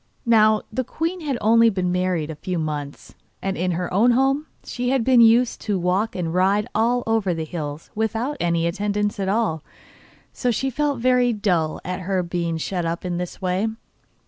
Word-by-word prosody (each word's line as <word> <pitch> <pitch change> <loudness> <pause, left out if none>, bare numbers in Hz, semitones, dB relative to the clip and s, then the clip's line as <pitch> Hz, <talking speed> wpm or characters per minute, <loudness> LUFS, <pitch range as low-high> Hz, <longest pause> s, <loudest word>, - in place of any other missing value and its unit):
Now 215 -2 +4
the 255 - 0
queen 330 +8 -3
had 285 -5 -2
only 230 +1 +5
been 185 -4 -1
married 180 -4 -1
a - - -7
few 180 +4 -4
months, 150 -3 -5 0.3
and 195 0 -2
in 180 +1 -1
her 180 +1 -3
own 220 +6 +4
home 270 +4 +1 0.2
she 245 0 -3
had 265 -2 +2
been 250 0 +5
used 230 +2 +4
to 205 -3 -1
walk 185 +5 0
and 170 -3 -2
ride 195 +3 +2
all 240 +3 +1
over 220 -6 +1
the 160 -1 -3
hills 150 -2 -6
without 225 +6 -1
any 170 -1 +1
attendants 205 +3 -1
at 190 -1 -1
all; 200 -7 0 0.7
so 250 - -1
she 265 +3 0
felt 290 +1 0
very 250 -1 +3
dull 180 -7 0
at 180 0 -3
her 185 0 -1
being 170 -1 -2
shut 175 +2 -2
up 170 +2 -3
in 175 -1 -2
this 180 +2 -6
way. 185 +4 0
200 Hz, 190 wpm, -22 LUFS, 175-235 Hz, 0.7 s, only